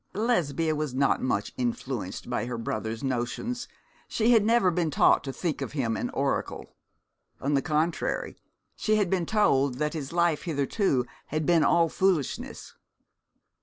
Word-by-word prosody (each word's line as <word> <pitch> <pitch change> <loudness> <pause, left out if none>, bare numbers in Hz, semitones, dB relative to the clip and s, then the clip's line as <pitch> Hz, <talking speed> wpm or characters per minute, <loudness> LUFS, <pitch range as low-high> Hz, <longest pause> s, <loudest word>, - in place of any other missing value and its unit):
Lesbia 165 - +1
was 150 -4 -3
not 135 +1 +2
much 105 -5 -1
influenced 120 -4 -3
by 120 -1 -2
her 125 -1 -4
brother's 110 0 -4
notions, 135 - -2 0.4
she 230 +2 +2
had 225 -3 +6
never 225 -4 +4
been 170 -2 0
taught 145 - +4
to 135 - -4
think 165 +3 -3
him 130 -4 -1
an - - -2
oracle. - - -2 0.6
On 140 +2 -1
the 140 - +3
contrary, 160 - -1 0.4
she 215 - +1
had 205 -4 +1
been 180 -4 0
told 140 - +2
that 150 +4 -1
his 145 -4 -5
life 170 -2 +2
hitherto 145 - 0 0.2
had 155 +1 -2
been 165 -1 +4
all 170 -1 +4
foolishness. 175 -5 -1
155 Hz, 150 wpm, -27 LUFS, 130-180 Hz, 0.6 s, had